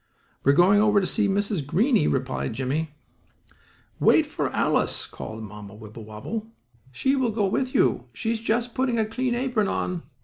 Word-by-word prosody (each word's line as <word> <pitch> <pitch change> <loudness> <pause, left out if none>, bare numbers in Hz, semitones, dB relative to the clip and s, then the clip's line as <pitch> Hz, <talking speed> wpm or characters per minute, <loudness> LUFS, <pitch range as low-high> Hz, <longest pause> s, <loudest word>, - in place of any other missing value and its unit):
"We 140 - +5
are - - +2
going 195 +5 +5
over 210 -1 +4
to 190 - -1
see 210 +2 +1
Mrs. 200 -4 0
Greenie," 200 - +2
replied 130 -2 -1
Jimmie. 145 +5 -2 1.0
"Wait - - +5
for - - -2
Alice," - - 0
called 110 0 -8
Mamma 105 0 -10
Wibblewobble. 110 - -7 0.4
"She 265 - +1
will 260 -3 +1
go 210 -2 0
with 255 +7 -1
you. - - +2
She 225 - -2
is 230 - -1
just 230 +2 -1
putting 255 -2 0
a 220 - +2
clean 245 +3 -1
apron 245 -5 0
on." 180 -3 -2
205 Hz, 170 wpm, -25 LUFS, -, 1.0 s, We